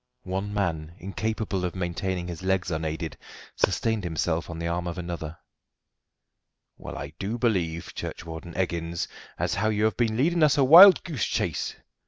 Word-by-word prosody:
One 95 Hz, +2 st, -3 dB
man, 85 Hz, -6 st, -2 dB
incapable 100 Hz, 0 st, -3 dB
of 90 Hz, 0 st, -2 dB
maintaining 90 Hz, 0 st, -2 dB
his 85 Hz, -1 st, -6 dB
legs 95 Hz, -1 st, 0 dB
unaided, 80 Hz, 0 st, -3 dB, 0.4 s
sustained 110 Hz, -3 st, 0 dB
himself 85 Hz, 0 st, -1 dB
on 85 Hz, -, -6 dB
the 85 Hz, -, -4 dB
arm 85 Hz, +1 st, -2 dB
of 85 Hz, +1 st, -4 dB
another. 85 Hz, -2 st, -5 dB, 1.4 s
"Well, -, -, -8 dB
I -, -, -7 dB
do 105 Hz, +5 st, -2 dB
believe, 90 Hz, -9 st, -1 dB
Churchwarden 80 Hz, +1 st, -7 dB
Eggins, 85 Hz, -2 st, -2 dB, 0.3 s
as -, -, -1 dB
how 110 Hz, +3 st, +1 dB
you 105 Hz, 0 st, 0 dB
have 110 Hz, -, +1 dB
been 115 Hz, -2 st, +1 dB
leading 170 Hz, +6 st, +2 dB
us 150 Hz, -1 st, +5 dB
a 140 Hz, -, +5 dB
wild 180 Hz, +8 st, +10 dB
goose 155 Hz, -, -2 dB
chase!" -, -, -2 dB
90 Hz, 160 wpm, -26 LUFS, 85-110 Hz, 1.4 s, wild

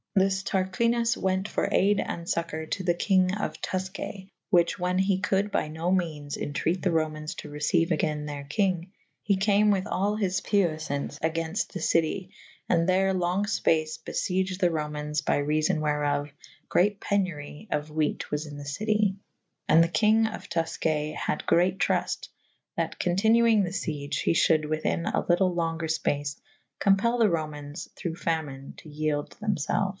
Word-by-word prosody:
This 190 Hz, 0 st, +2 dB
Tarquinus 230 Hz, +6 st, +1 dB
wente 190 Hz, +1 st, 0 dB
for -, -, -1 dB
ayde 205 Hz, +2 st, +3 dB
and 170 Hz, -, -5 dB
focour 165 Hz, -2 st, -2 dB
to 190 Hz, -, -1 dB
the 175 Hz, -1 st, +3 dB
kynge 185 Hz, +2 st, +2 dB
of -, -, -4 dB
Tufcaye 190 Hz, +1 st, -4 dB
/ -, -, -60 dB
which 175 Hz, -3 st, +3 dB
wha« 180 Hz, 0 st, -1 dB
he 190 Hz, 0 st, +2 dB
could 200 Hz, +1 st, 0 dB
by -, -, 0 dB
no 160 Hz, +3 st, -2 dB
menes 155 Hz, -6 st, -1 dB
entreat 155 Hz, +5 st, -1 dB
the 185 Hz, -, +1 dB
Romains 155 Hz, -1 st, -1 dB
to 150 Hz, -, -8 dB
receiue 150 Hz, +3 st, +1 dB
agayn 155 Hz, -2 st, 0 dB
their 145 Hz, -1 st, -5 dB
kynge 185 Hz, 0 st, 0 dB, 0.4 s
/he 195 Hz, -2 st, +3 dB
cam 205 Hz, +1 st, +4 dB
with 190 Hz, -2 st, +1 dB
all 200 Hz, +3 st, 0 dB
his 190 Hz, -3 st, 0 dB
puyflaunce 155 Hz, -8 st, 0 dB
agaynft 165 Hz, +4 st, -1 dB
the 185 Hz, -, -5 dB
citye 165 Hz, +3 st, +1 dB, 0.2 s
/ -, -, -28 dB
and 170 Hz, +1 st, +3 dB
there 190 Hz, +1 st, +3 dB
longe 185 Hz, +3 st, 0 dB
fpace 155 Hz, -6 st, +1 dB
bei'ieged 185 Hz, 0 st, -1 dB
the 180 Hz, -, +4 dB
Romaynes 150 Hz, -1 st, -2 dB
by -, -, +2 dB
realbn 155 Hz, +2 st, +1 dB
wherot, 145 Hz, -1 st, 0 dB, 0.4 s
great 205 Hz, +2 st, +2 dB
penury 185 Hz, -3 st, -2 dB
of 150 Hz, 0 st, -1 dB
whete 155 Hz, 0 st, -1 dB
was 150 Hz, +1 st, -1 dB
in 145 Hz, -1 st, -8 dB
the 145 Hz, -, -7 dB
citye 210 Hz, +6 st, +1 dB, 0.3 s
/ -, -, -39 dB
and 160 Hz, -, +7 dB
the -, -, +2 dB
kynge 215 Hz, +7 st, +3 dB
of -, -, -11 dB
Tufcay 155 Hz, -2 st, -1 dB
hadde -, -, -2 dB
great 180 Hz, +2 st, +3 dB
trufte -, -, 0 dB, 0.2 s
/ -, -, -46 dB
that -, -, -2 dB
continuynge 220 Hz, +4 st, +4 dB
the 180 Hz, -, -2 dB
siege 150 Hz, -6 st, -3 dB
/ -, -, -2 dB
he -, -, +3 dB
I'hulde 155 Hz, -2 st, +3 dB
within 155 Hz, +2 st, -1 dB
a -, -, 0 dB
lytel 180 Hz, +1 st, +2 dB
lenger 165 Hz, -1 st, -1 dB
Ipace 145 Hz, -2 st, -1 dB, 0.4 s
compell 205 Hz, +4 st, +3 dB
the 220 Hz, -2 st, +5 dB
Romaynes 150 Hz, -2 st, -4 dB
through 170 Hz, -3 st, -4 dB
famine 150 Hz, -6 st, -3 dB
to 155 Hz, -, -13 dB
yelde 150 Hz, -1 st, -2 dB
them 210 Hz, -2 st, 0 dB
felfe. 185 Hz, +6 st, 0 dB
170 Hz, 175 wpm, -27 LUFS, 155-195 Hz, 0.4 s, and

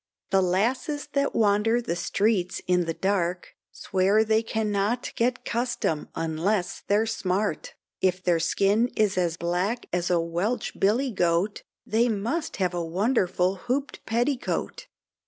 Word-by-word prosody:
The 195 Hz, -, +4 dB
lasses 245 Hz, -, 0 dB
that 280 Hz, 0 st, 0 dB
wander 215 Hz, +2 st, +3 dB
the 200 Hz, -8 st, -2 dB
streets 195 Hz, 0 st, 0 dB
in 180 Hz, -1 st, +2 dB
the 165 Hz, -, -2 dB
dark, 180 Hz, -2 st, -1 dB, 0.2 s
Swear 195 Hz, +3 st, +2 dB
they 220 Hz, 0 st, +2 dB
cannot 220 Hz, +1 st, -1 dB
get 240 Hz, +1 st, 0 dB
custom 235 Hz, -10 st, -1 dB
unless 175 Hz, +4 st, -1 dB
they're 210 Hz, +2 st, +3 dB
smart, 190 Hz, -6 st, -2 dB, 0.3 s
If 185 Hz, 0 st, +1 dB
their 175 Hz, -2 st, +2 dB
skin 200 Hz, +7 st, +2 dB
is 210 Hz, -3 st, +2 dB
as 175 Hz, -3 st, 0 dB
black 180 Hz, +7 st, -1 dB
as 175 Hz, 0 st, 0 dB
a 175 Hz, -1 st, +3 dB
Welch 175 Hz, +8 st, -2 dB
Billy 240 Hz, +7 st, +2 dB
Goat, 180 Hz, +1 st, +1 dB, 0.2 s
They 230 Hz, +3 st, +2 dB
must 235 Hz, +10 st, -2 dB
have 185 Hz, -2 st, 0 dB
a 175 Hz, -1 st, -2 dB
wonderful 185 Hz, 0 st, +1 dB
hooped 255 Hz, +8 st, -3 dB
petticoat. 245 Hz, +4 st, -1 dB
200 Hz, 135 wpm, -26 LUFS, 180-230 Hz, 0.3 s, The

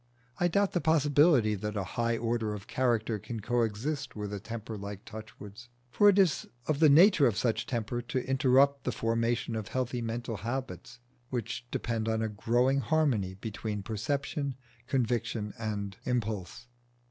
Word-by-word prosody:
I 175 Hz, -, +3 dB
doubt 200 Hz, +3 st, +2 dB
the 175 Hz, -, 0 dB
possibility 145 Hz, -6 st, +4 dB
that 105 Hz, +1 st, -3 dB
a 100 Hz, -, 0 dB
high 115 Hz, 0 st, 0 dB
order 115 Hz, -2 st, -1 dB
of 100 Hz, -, -9 dB
character 115 Hz, -4 st, 0 dB
can 115 Hz, +3 st, -6 dB
coexist 120 Hz, +5 st, -1 dB
with 105 Hz, -1 st, -5 dB
a 100 Hz, -, -3 dB
temper 110 Hz, +1 st, -6 dB
like 100 Hz, 0 st, -7 dB
Touchwood's. 110 Hz, +1 st, -10 dB, 0.2 s
For 205 Hz, +8 st, +6 dB
it 200 Hz, -, +3 dB
is 185 Hz, -7 st, +3 dB, 0.2 s
of 150 Hz, -2 st, 0 dB
the 155 Hz, -2 st, +7 dB
nature 165 Hz, 0 st, +7 dB
of 110 Hz, -4 st, 0 dB
such 115 Hz, 0 st, 0 dB
temper 120 Hz, 0 st, -2 dB
to 125 Hz, +1 st, -3 dB
interrupt 135 Hz, +1 st, +3 dB
the 125 Hz, -, -1 dB
formation 115 Hz, +1 st, 0 dB
of 110 Hz, -3 st, -4 dB
healthy 125 Hz, -1 st, -2 dB
mental 115 Hz, -1 st, -3 dB
habits, 120 Hz, 0 st, -5 dB, 0.3 s
which 120 Hz, 0 st, -4 dB
depend 115 Hz, -2 st, -2 dB
on 110 Hz, 0 st, 0 dB
a 110 Hz, -, -1 dB
growing 120 Hz, +6 st, +2 dB
harmony 135 Hz, -, +1 dB
between 105 Hz, 0 st, -5 dB
perception, 140 Hz, -, -2 dB, 0.3 s
conviction, 120 Hz, -4 st, -1 dB
and 100 Hz, -3 st, -3 dB
impulse. 110 Hz, -4 st, -2 dB
115 Hz, 160 wpm, -30 LUFS, 110-135 Hz, 0.3 s, the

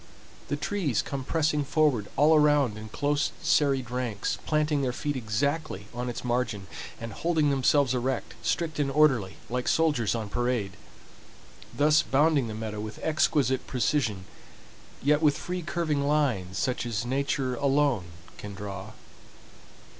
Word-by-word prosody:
The -, -, -1 dB
trees 150 Hz, -, -1 dB
come 135 Hz, -2 st, -4 dB
pressing 150 Hz, 0 st, +1 dB
forward 140 Hz, -8 st, +1 dB
all 155 Hz, +3 st, +6 dB
around 145 Hz, -6 st, +4 dB
in 110 Hz, 0 st, -8 dB
close 145 Hz, +5 st, 0 dB
serried 140 Hz, -6 st, +2 dB
ranks, 120 Hz, -5 st, -2 dB
planting 150 Hz, -1 st, +1 dB
their 130 Hz, -2 st, 0 dB
feet 145 Hz, +2 st, -3 dB
exactly 130 Hz, 0 st, -2 dB
on 125 Hz, +1 st, -3 dB
its 120 Hz, -, -5 dB
margin, 120 Hz, -5 st, -1 dB, 0.3 s
and 115 Hz, -2 st, -6 dB
holding 155 Hz, -1 st, +1 dB
themselves 135 Hz, 0 st, +3 dB
erect, 130 Hz, +1 st, -2 dB
strict 160 Hz, -3 st, -1 dB
and 140 Hz, -2 st, +1 dB
orderly 135 Hz, -10 st, +3 dB
like 125 Hz, +2 st, -3 dB
soldiers 145 Hz, -10 st, +2 dB
on 110 Hz, -2 st, -3 dB
parade; 120 Hz, -3 st, -1 dB, 1.0 s
thus 150 Hz, +1 st, +4 dB
bounding 145 Hz, -2 st, +2 dB
the 110 Hz, -, -5 dB
meadow 110 Hz, -1 st, -5 dB
with 110 Hz, 0 st, -6 dB
exquisite 145 Hz, -4 st, +1 dB
precision, 115 Hz, -7 st, 0 dB, 0.8 s
yet 150 Hz, +2 st, +3 dB
with 150 Hz, -2 st, +3 dB
free 180 Hz, 0 st, -4 dB
curving 155 Hz, -4 st, -1 dB
lines 120 Hz, -12 st, 0 dB
such 125 Hz, -, -1 dB
as 115 Hz, -1 st, -2 dB
Nature 135 Hz, 0 st, -1 dB
alone 140 Hz, -5 st, +1 dB, 0.3 s
can 105 Hz, -1 st, -7 dB
draw. 100 Hz, +1 st, -7 dB
135 Hz, 140 wpm, -27 LUFS, 115-150 Hz, 1.0 s, all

